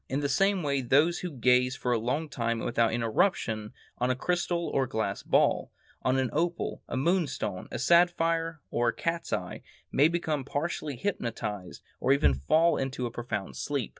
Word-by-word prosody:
In 135 +2 -1
the 140 - 0
same 195 +5 +2
way 140 -2 0
those 145 +7 +3
who 180 -2 -4
gaze 125 -2 +2
for 125 - -2
a 120 - +2
long 135 +8 -1
time 115 -5 -1
and - - -4
without 115 -1 +2
interruption 115 - 0 0.3
on 125 +1 +1
a 130 - +2
crystal 170 +3 -1
or 135 -1 0
glass 110 -5 -2
ball, - - +2 0.3
on 130 +1 +1
an 130 -2 0
opal, 170 +3 -1
a - - -3
moonstone, 140 - -1
a - - -4
sapphire, 165 +1 +2
or 120 0 +1
a 115 - +1
cat's 165 0 -2
eye, - - -3 0.3
may 145 +3 +5
become 160 -4 -1
partially 145 +1 -3
hypnotized 110 - -4 0.2
or 130 - +3
even 140 - +3
fall 155 - +3
into 135 -1 -2
a 120 - -3
profound 115 -5 -4
sleep. 140 -5 -2
135 Hz, 180 wpm, -28 LUFS, 120-165 Hz, 0.3 s, may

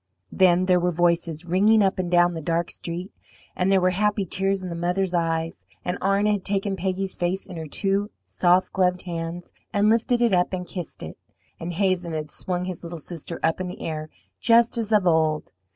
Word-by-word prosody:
Then 185 -1 +4
there 180 -1 +4
were 175 +1 +1
voices 170 -1 0
ringing 205 +5 +4
up 195 0 +1
and 180 -1 -1
down 175 0 +4
the 165 - -5
dark 165 +2 -1
street, 175 +3 -5 0.4
and 185 +1 +1
there 195 - +5
were 185 0 +2
happy 205 +1 +1
tears 195 +2 0
in 185 - -4
the 170 - -4
mother's 180 +2 -1
eyes, 165 -1 -1 0.2
and 180 - -2
Arna 200 +2 +2
had 205 -3 -1
taken 195 0 -1
Peggy's 190 +1 -2
face 180 +2 -1
in 185 - -9
her 160 -1 -5
two 200 +5 0 0.2
soft 180 +1 +2
gloved 180 -1 +1
hands 170 0 -5 0.2
and 205 +1 +3
lifted 235 +2 +2
it 235 -4 +3
up 180 +1 +2
and 180 -1 -3
kissed 175 -1 -7
it, - - -8 0.4
and 170 +1 -4
Hazen 180 -2 0
had 155 -1 -4
swung 180 -1 -3
his 185 -2 -5
little 170 0 -6
sister 165 +1 -8
up 165 +3 +1
in 185 - -3
the 180 - -7
air 155 -1 -4 0.3
just 230 +1 +4
as 225 -2 -3
of 210 -3 +4
old. 160 -2 +2
180 Hz, 205 wpm, -24 LUFS, 170-195 Hz, 0.4 s, there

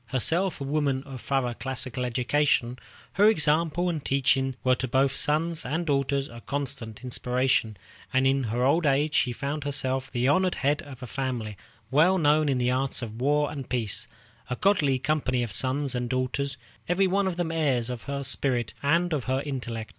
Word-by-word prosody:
Herself 165 +9 +1
a - - -4
woman 140 -2 0
of 135 -4 -9
thorough 135 -3 0
classical 130 0 -2
education, 125 0 +1 0.3
her 205 +3 +5
example 165 -1 +2
and 160 -5 -2
teaching 135 -1 +1
were 130 - +4
to 130 0 -2
both 135 +2 +2
sons 160 +3 +1
and 160 +7 -2
daughters 140 -1 0
a 115 0 -11
constant 130 -6 -4
inspiration; 125 -3 0 0.3
and 130 0 +2
in 135 -1 +2
her 120 +3 -1
old 150 +5 +3
age 145 +2 +2
she 125 - +2
found 140 +4 -3
herself 135 -2 -1
the 125 0 0
honored 185 +5 +3
head 145 +2 +1
of 130 -3 -11
a - - -4
family 120 -3 -3 0.4
well 165 +7 +4
known 150 -2 +3
in 135 - +1
the 125 0 +1
arts 130 0 -1
of 115 +1 -7
war 145 +2 +2
and 140 -3 -7
peace, 115 -5 -2 0.4
a 125 - -1
goodly 150 -7 +2
company 130 -3 0
of 115 - -4
sons 135 +1 0
and 125 -1 -2
daughters, 130 +2 -1 0.3
every 185 +2 +3
one 195 +1 +1
of 180 -2 -2
them 175 -2 -1
heirs 140 -8 +1
of 120 -2 -5
her 140 0 -2
spirit 130 -3 -1
and 170 +4 +2
of 140 -6 -2
her 130 +2 0
intellect. 120 -6 -4
135 Hz, 185 wpm, -26 LUFS, 125-150 Hz, 0.4 s, her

